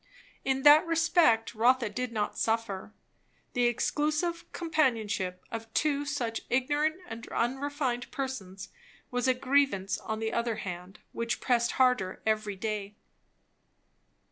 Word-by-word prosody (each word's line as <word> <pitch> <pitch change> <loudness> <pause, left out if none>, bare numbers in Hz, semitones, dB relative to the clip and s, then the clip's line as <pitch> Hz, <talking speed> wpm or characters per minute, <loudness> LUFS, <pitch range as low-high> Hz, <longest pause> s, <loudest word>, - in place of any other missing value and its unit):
In 265 0 0
that 295 +2 +9
respect 325 -9 +3
Rotha 240 +2 +3
did 250 +4 -3
not 210 -2 -2
suffer; 220 -4 -1 0.6
the 245 0 +2
exclusive 305 +7 -1
companionship 225 - 0
of 225 0 -6
two 290 -1 +1
such 245 -6 -2
ignorant 290 +5 +1
and 230 -4 -8
unrefined 265 0 -1
persons 200 -9 -5 0.4
was 245 0 0
a 260 - +4
grievance 260 -7 +1
on 220 -1 -4
the 220 0 -2
other 235 -1 0
hand 180 0 -7
which 230 +1 -2
pressed 235 -2 +1
harder 250 -8 +2
every 215 -2 0
day. 210 0 -4
240 Hz, 120 wpm, -29 LUFS, 215-280 Hz, 0.6 s, that